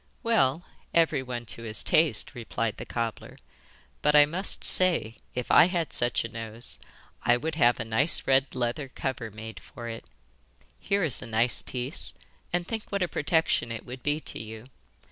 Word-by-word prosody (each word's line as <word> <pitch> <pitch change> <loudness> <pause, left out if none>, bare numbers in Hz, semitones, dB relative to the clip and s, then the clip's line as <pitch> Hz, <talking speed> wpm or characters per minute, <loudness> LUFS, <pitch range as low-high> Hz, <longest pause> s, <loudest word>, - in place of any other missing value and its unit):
'Well, 175 - +1 0.3
everyone 130 -7 0
to 115 - -7
his 110 -1 +1
taste,' 155 -3 +2
replied 115 -2 -3
the - - -8
cobbler; 115 -2 -4 0.6
'but 150 - +2
I 145 0 +8
must 180 +6 0
say 170 -12 +6 0.2
if 125 -1 -3
I - - +8
had 175 -3 -2
such 120 -1 +1
a - - -3
nose 115 +1 -7 0.4
I 120 - +3
would 160 +5 -4
have 120 -6 +3
a 115 - -3
nice 120 +9 +3
red 135 0 +2
leather 125 +3 -2
cover 130 -3 -4
made 110 +1 -9
for 120 -1 -10
it. 115 0 -8 0.7
Here 200 -1 0
is 150 -8 -1
a 125 - -8
nice 115 +2 +2
piece; 125 +4 -4 0.4
and 175 0 -1
think 220 -2 -5
what 200 -2 0
a - - 0
protection 160 -9 +1
it 115 - -6
would 125 +1 -9
be 145 +4 -1
to - - -6
you. 110 +3 -9
125 Hz, 175 wpm, -27 LUFS, 115-160 Hz, 0.7 s, I